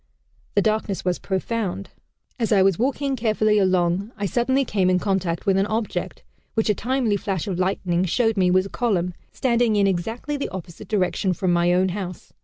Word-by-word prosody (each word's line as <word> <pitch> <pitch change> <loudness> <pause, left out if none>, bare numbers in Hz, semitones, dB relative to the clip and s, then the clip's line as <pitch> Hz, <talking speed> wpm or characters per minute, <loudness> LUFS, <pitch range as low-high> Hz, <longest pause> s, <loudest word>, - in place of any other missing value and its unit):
The 200 - +4
darkness 215 -3 -1
was 180 -1 0
profound. 195 -1 -3 0.5
As 230 -2 0
I 195 -3 +5
was 190 -3 +2
walking 275 +2 0
carefully 215 -2 +2
along, 185 +2 +1
I 205 - -2
suddenly 260 +6 +1
came 195 -5 +1
in 185 - +3
contact 185 -2 -1
with 195 -2 +3
an 195 - +1
object, 220 0 -3 0.3
which 220 -1 +2
a - - +2
timely 240 -1 0
flash 190 -4 -3
of 185 -3 -3
lightning 185 -1 0
showed 225 +5 +1
me 185 -3 +3
was 185 +1 +3
a - - -7
column, 185 -8 0 0.2
standing 235 -3 +1
in 200 -1 +3
exactly 225 +10 -2
the 280 - -3
opposite 185 +1 -8
direction 190 -2 0
from 180 0 0
my 175 0 +3
own 185 +1 +3
house. 180 -2 -6
195 Hz, 190 wpm, -23 LUFS, 185-225 Hz, 0.5 s, I